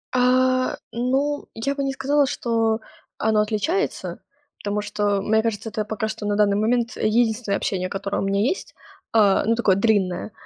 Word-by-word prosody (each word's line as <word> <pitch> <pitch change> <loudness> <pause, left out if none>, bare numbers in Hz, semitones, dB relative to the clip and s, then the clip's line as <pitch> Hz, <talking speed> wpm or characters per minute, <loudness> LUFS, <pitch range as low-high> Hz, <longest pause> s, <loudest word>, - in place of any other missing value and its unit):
А. 255 +1 +3
Ну, 270 +5 0
я 275 +5 -2
бы 280 - -2
не 275 - 0
сказала, 280 +2 +2
что 225 -3 0 0.4
оно 215 -1 +2
отличается, 230 - -1 0.4
потому 205 0 -1
что, 205 -1 0
мне 220 +2 +2
кажется, 225 0 -2
это 215 0 -3
пока 220 0 -3
что 220 -1 -5
на 205 0 0
данный 205 -1 +3
момент 235 +2 +1
единственное 220 -1 +1
общение, 185 -2 -2
которое 200 +1 -3
у - - -1
меня 200 +1 +1
есть, 270 - -1 0.4
э, 205 -3 +5
ну, 230 +1 +2
такое 210 -5 +3
длинное. 200 -1 +1
220 Hz, 165 wpm, -23 LUFS, 205-250 Hz, 0.4 s, э